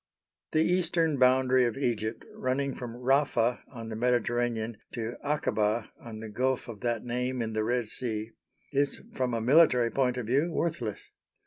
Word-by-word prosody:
The 155 0 +4
eastern 165 -4 +1
boundary 130 0 +5
of 120 0 -2
Egypt, 115 -4 -2
running 135 +2 -1
from 120 -2 -7
Rafa 125 -2 +2
on 115 -3 -7
the 110 - -4
Mediterranean 120 -1 0 0.2
to 115 0 -3
Akaba 115 -7 0
on 110 -2 -8
the 110 - -6
Gulf 130 +4 0
of 115 -3 -8
that 120 -1 -2
name 125 +1 -2
in 110 -1 -2
the 110 0 0
Red 120 0 0
Sea, 110 -1 -3 0.4
is, 140 0 +1 0.2
from 125 -2 0
a 115 - -1
military 125 -2 +5
point 125 -2 +1
of 125 - -3
view, 140 +9 +1
worthless. 125 -12 -3
125 Hz, 160 wpm, -29 LUFS, 115-135 Hz, 0.4 s, boundary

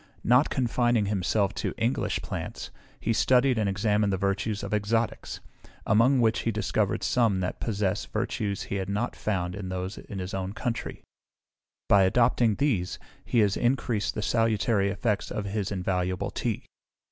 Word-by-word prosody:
Not 125 +5 +4
confining 120 -3 +1
himself 100 0 0
to - - -3
English 115 +3 0
Plants, - - -5 0.3
he 115 - 0
studied 125 +1 +3
and 105 -2 +1
examined 105 +1 +1
the 95 - 0
virtues 100 +2 -1
of 100 +2 -4
Exotics, 110 +2 -1 0.4
among 125 +5 +4
which 115 -2 +3
he - - -1
discovered 105 -2 0
some 110 0 +2
that 90 - -3
possess 105 -2 -1
virtues 110 -2 -2
he 100 - -3
had 95 0 -3
not 105 +5 -1
found 90 -4 -2
in 95 -1 -5
those 95 +1 -4
of - - -12
his 95 -3 -5
own 95 0 -3
country: 115 +2 -4 0.8
by 100 - +6
adopting 115 +2 +3
these, 110 -11 0 0.3
he 120 - +2
has 100 -2 +2
increased 120 -3 0
the 105 - -2
salutary 110 -3 +2
effects 105 +1 -1
of 105 - -3
his 100 0 -2
invaluable 90 -1 -1
tea. - - -3
105 Hz, 160 wpm, -27 LUFS, 95-115 Hz, 0.8 s, by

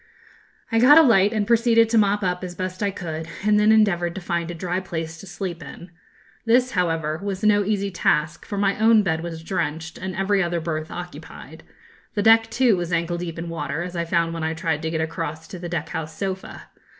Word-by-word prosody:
I 225 - +3
got 275 +6 +8
a 325 - +9
light, 210 -7 +4
and 215 -2 0
proceeded 230 0 +4
to 230 - +2
mop 205 0 +2
up, 180 0 -1
as 180 -1 -6
best 185 +1 -5
I 205 - +1
could, 165 -4 -6 0.2
and 210 0 +4
then 210 +1 +4
endeavoured 175 -6 +2
to 190 - -5
find 170 -1 -2
a 175 - -5
dry 180 +2 -2
place 165 -3 -5
to 195 - -11
sleep 180 -2 -5
in. 175 0 -11 0.5
This, 245 +2 +3
however, 165 -3 -1
was 200 0 -4
no 205 -1 +4
easy 200 -1 -1
task, 155 -3 0
for 205 - -6
my 200 0 +1
own 220 -1 +5
bed 160 -4 -1
was 165 -1 -6
drenched, 160 -3 -3
and 185 0 -5
every 195 +1 +1
other 170 -1 -1
berth 155 -1 -4
occupied. 175 0 -9 0.5
The 205 - 0
deck, 225 +1 +5
too, 240 -2 +3
was 175 -1 -4
ankle 170 0 -1
deep 170 -2 -5
in 165 +1 -5
water, 165 0 -3
as 180 0 -7
I 170 0 -1
found 170 -1 0
when 165 -1 -4
I 160 0 -1
tried 160 -2 -1
to 160 - -2
get 160 0 -1
across 160 -1 -4
to 185 -3 -8
the 175 0 -6
deck 165 -2 -3
house 160 -2 -5
sofa. 190 0 -5
180 Hz, 220 wpm, -23 LUFS, 165-205 Hz, 0.5 s, a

